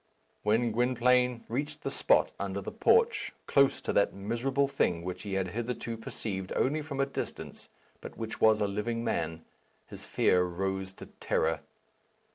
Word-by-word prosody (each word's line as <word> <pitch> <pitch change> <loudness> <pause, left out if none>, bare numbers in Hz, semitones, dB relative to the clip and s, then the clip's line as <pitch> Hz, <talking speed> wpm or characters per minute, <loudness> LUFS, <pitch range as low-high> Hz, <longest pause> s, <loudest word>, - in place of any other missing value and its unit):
When 115 +3 +2
Gwynplaine 125 +1 +2
reached 140 +6 -3
the - - -2
spot - - +3
under 100 0 -2
the 100 - -6
porch, 460 +1 +3
close 140 -1 +3
to - - -2
that 100 - +2
miserable 120 +7 0
thing 85 -10 0
which 90 0 -5
he 100 -3 -4
had 95 -1 0
hitherto 120 +2 -3
perceived 100 -4 -5
only 150 +4 +1
from 145 -3 -6
a 135 - +3
distance, 140 - -6 0.3
but - - -9
which 115 -1 -5
was 110 -1 +5
a 105 - +2
living 110 +4 -2
man, 80 -5 -2 0.4
his - - -11
fear 90 - +3
rose 95 +2 -2
to - - -10
terror. 80 -1 -1
110 Hz, 160 wpm, -30 LUFS, 95-125 Hz, 0.4 s, was